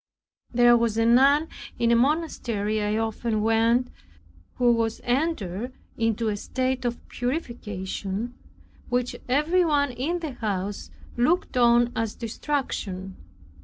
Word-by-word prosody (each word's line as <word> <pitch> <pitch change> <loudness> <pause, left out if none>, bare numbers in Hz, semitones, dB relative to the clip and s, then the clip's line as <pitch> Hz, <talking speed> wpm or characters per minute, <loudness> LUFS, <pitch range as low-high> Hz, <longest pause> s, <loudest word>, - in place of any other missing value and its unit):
There 240 0 +6
was 230 -2 +1
a 225 - +3
nun 275 +6 +5 0.3
in 235 0 +2
a - - +5
monastery 235 -7 0
I 210 +1 0
often 225 -1 -1
went 225 +2 +3
to, - - -19 0.6
who 245 -1 +4
was 230 -1 0
entered 245 - -1 0.2
into 225 0 0
a 210 - -1
state 255 +4 -2
of 240 0 -3
purification, 230 - -4 0.6
which 245 0 0
everyone 295 0 +2
in 275 +8 -2
the 320 -4 -4
house 205 -4 -3 0.3
looked 310 +8 +1
on 240 -1 +4
as 225 -2 -2
distraction. 215 -7 -3
240 Hz, 125 wpm, -25 LUFS, 220-260 Hz, 0.6 s, There